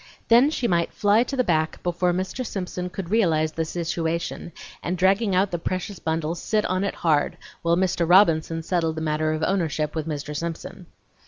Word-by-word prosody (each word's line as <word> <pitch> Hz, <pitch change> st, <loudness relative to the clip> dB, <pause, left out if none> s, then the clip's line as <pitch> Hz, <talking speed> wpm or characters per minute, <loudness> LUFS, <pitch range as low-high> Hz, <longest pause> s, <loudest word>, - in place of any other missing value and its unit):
Then 240 Hz, +5 st, +6 dB
she 260 Hz, -6 st, -1 dB
might 170 Hz, -3 st, +1 dB
fly 205 Hz, +2 st, +4 dB
to 275 Hz, -, -4 dB
the 255 Hz, -, +3 dB
back 160 Hz, -5 st, 0 dB
before 175 Hz, 0 st, +1 dB
Mr. 185 Hz, +8 st, -3 dB
Simpson 180 Hz, -4 st, -4 dB
could 180 Hz, 0 st, -6 dB
realize 160 Hz, -8 st, +2 dB
the 160 Hz, +1 st, -2 dB
situation, 170 Hz, 0 st, -3 dB, 0.3 s
and 180 Hz, +2 st, -2 dB
dragging 195 Hz, +2 st, +2 dB
out 190 Hz, +1 st, +2 dB
the 175 Hz, -, -2 dB
precious 185 Hz, +3 st, -4 dB
bundle, 160 Hz, 0 st, -1 dB
sit 210 Hz, +5 st, -1 dB
on 185 Hz, +1 st, 0 dB
it 200 Hz, -, -2 dB
hard, 155 Hz, -4 st, +1 dB, 0.2 s
while 170 Hz, 0 st, +2 dB
Mr. 180 Hz, -2 st, +1 dB
Robinson 165 Hz, -3 st, +4 dB
settled 165 Hz, -2 st, 0 dB
the 160 Hz, -, -4 dB
matter 155 Hz, 0 st, 0 dB
of 155 Hz, 0 st, -2 dB
ownership 160 Hz, -5 st, 0 dB
with 160 Hz, -1 st, -3 dB
Mr. 150 Hz, 0 st, -4 dB
Simpson. 165 Hz, +1 st, -6 dB
170 Hz, 185 wpm, -24 LUFS, 160-190 Hz, 0.3 s, Then